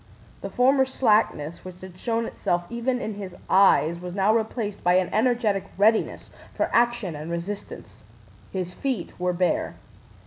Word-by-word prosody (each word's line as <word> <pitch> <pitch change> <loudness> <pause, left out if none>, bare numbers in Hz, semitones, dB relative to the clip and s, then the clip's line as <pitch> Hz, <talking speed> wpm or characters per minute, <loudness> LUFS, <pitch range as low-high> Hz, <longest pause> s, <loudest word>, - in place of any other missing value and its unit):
The - - -5
former 265 +2 +3
slackness 210 - +1
which 185 -1 -10
had 185 -1 -10
shown 230 -1 -1
itself 175 -5 -1
even 240 +2 -1
in 220 -3 -4
his 195 -3 -8 0.2
eyes 170 -4 +4
was 180 0 -7
now 200 +2 +3
replaced 220 -2 -2
by 180 0 +4
an 185 -1 +1
energetic 220 -3 +1
readiness 215 +3 +2 0.2
for - - -1
action 235 -7 +2
and 150 +2 -7
resistance. 170 +4 -6 0.5
His 180 -2 -4
feet 255 -8 -3
were 180 0 +1
bare. 180 0 0
200 Hz, 150 wpm, -25 LUFS, 180-230 Hz, 0.5 s, eyes